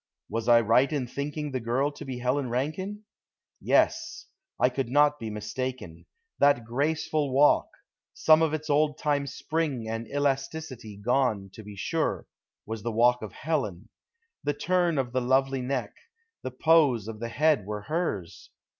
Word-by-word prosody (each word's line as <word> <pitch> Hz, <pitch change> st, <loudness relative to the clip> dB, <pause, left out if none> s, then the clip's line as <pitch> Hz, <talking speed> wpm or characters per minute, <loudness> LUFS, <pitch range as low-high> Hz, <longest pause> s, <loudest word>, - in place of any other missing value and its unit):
Was 115 Hz, +1 st, -3 dB
I 120 Hz, -1 st, +7 dB
right 115 Hz, +6 st, +3 dB
in 145 Hz, -4 st, -1 dB
thinking 145 Hz, +3 st, -4 dB
the 130 Hz, -, -2 dB
girl 125 Hz, +5 st, 0 dB
to -, -, -10 dB
be 130 Hz, -2 st, -5 dB
Helen 125 Hz, +2 st, -1 dB
Rankine. 170 Hz, -, -3 dB, 0.6 s
Yes; -, -, +1 dB, 0.3 s
I 125 Hz, -, +4 dB
could 130 Hz, -1 st, -3 dB
not 145 Hz, +2 st, +3 dB
be 115 Hz, -, -5 dB
mistaken. 105 Hz, -3 st, -5 dB, 0.3 s
That 140 Hz, -5 st, +4 dB
graceful 145 Hz, +3 st, -1 dB
walk, 140 Hz, +3 st, +4 dB, 0.4 s
some 155 Hz, 0 st, +4 dB
of 160 Hz, -2 st, +2 dB
its 155 Hz, 0 st, -3 dB
old 150 Hz, 0 st, +2 dB
time 145 Hz, -2 st, 0 dB
spring 140 Hz, -2 st, -2 dB
and 115 Hz, +1 st, -4 dB
elasticity 135 Hz, -5 st, -3 dB
gone, 110 Hz, -3 st, 0 dB
to -, -, -10 dB
be 105 Hz, -1 st, -10 dB
sure, 95 Hz, -, -1 dB, 0.4 s
was 110 Hz, 0 st, -5 dB
the 115 Hz, -, -3 dB
walk 120 Hz, +2 st, +3 dB
of 110 Hz, -4 st, -7 dB
Helen; 115 Hz, -, -3 dB, 0.5 s
the 145 Hz, -, -1 dB
turn 175 Hz, -3 st, +1 dB
of 130 Hz, -3 st, -1 dB
the 130 Hz, -, +1 dB
lovely 135 Hz, +1 st, +1 dB
neck; 130 Hz, 0 st, -2 dB, 0.5 s
the -, -, -4 dB
pose 130 Hz, -5 st, +3 dB
of 110 Hz, -1 st, -7 dB
the 115 Hz, +1 st, -4 dB
head 145 Hz, -4 st, +2 dB
were 105 Hz, 0 st, -4 dB
hers. 150 Hz, -, -3 dB
130 Hz, 160 wpm, -27 LUFS, 115-150 Hz, 0.6 s, I